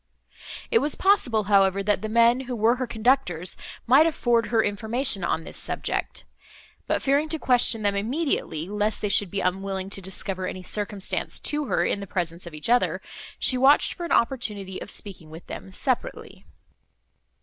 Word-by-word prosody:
It 455 - +5
was 300 - -1
possible, 255 - +2
however, 195 -1 +3
that 205 -1 +1
the 215 - -4
men, 235 +2 +4
who 250 - -2
were 230 +2 +2
her 255 0 -3
conductors, 220 -7 0 0.3
might 275 +7 +6
afford 240 -7 +1
her 225 -2 +2
information, 220 +1 0
on 165 -1 -1
this - - -10
subject; - - -4 0.6
but, - - 0
fearing 285 +3 +2
to 320 - -1
question 245 -5 +2
them 205 -1 +2
immediately, 220 - -2
lest 210 +2 -1
they 210 - 0
should 200 -1 +3
be 195 +2 -3
unwilling 190 +1 -2
to 195 - -3
discover 190 0 -4
any 185 - -6
circumstance 205 0 -2
to 295 0 +1
her - - 0
in - - -1
the 200 - -7
presence 175 -2 -4
of 165 - -9
each 150 - -4
other, 245 +1 +2 0.4
she 255 - +3
watched 275 +3 +4
for 350 - -8
an 340 - -5
opportunity 210 -6 0
of - - -8
speaking 185 -8 -8
with 160 +2 -11
them 95 - -8
separately. - - -3
210 Hz, 175 wpm, -25 LUFS, 190-250 Hz, 0.6 s, might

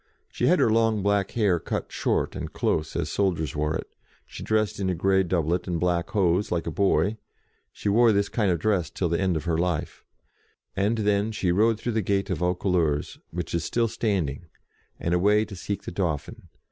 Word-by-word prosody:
She - - 0
had - - +5
her - - +3
long 110 -2 +2
black 100 -1 +1
hair 100 -6 +3
cut - - -4
short - - -1
and - - -5
close, 75 -1 -1
as - - -2
soldiers 85 -7 0
wore 75 +1 0
it; - - -4 0.4
she - - -10
dressed 110 -2 0
in 95 -2 0
a 90 - 0
grey 95 +3 +3
doublet 90 -1 0
and 85 -2 -1
black 85 0 0
hose, 95 -2 +1
like 85 -2 -1
a 80 - -3
boy 100 +3 +1 0.5
(she - - -6
wore 115 +3 +5
this 100 -1 +2
kind 105 -5 0
of 85 - +2
dress 90 -3 0
till 85 +5 -2
the 85 +3 0
end 95 -3 +1
of 80 - -6
her 85 -2 0
life); 85 -3 -2 0.7
and 105 +4 +1
then 105 0 +1
she 95 -4 0
rode 110 +4 +3
through 120 - -2
the 110 -1 0
gate 100 0 0
of - - -1
Vaucouleurs, 90 -4 0
which 90 +1 -5
is 85 -1 0
still 115 +5 +1
standing, 95 - -2 0.5
and 85 - -1
away 105 +4 +3
to 100 - -9
seek 100 +2 -4
the - - -6
Dauphin. 85 -5 -3
95 Hz, 205 wpm, -25 LUFS, 85-105 Hz, 0.7 s, had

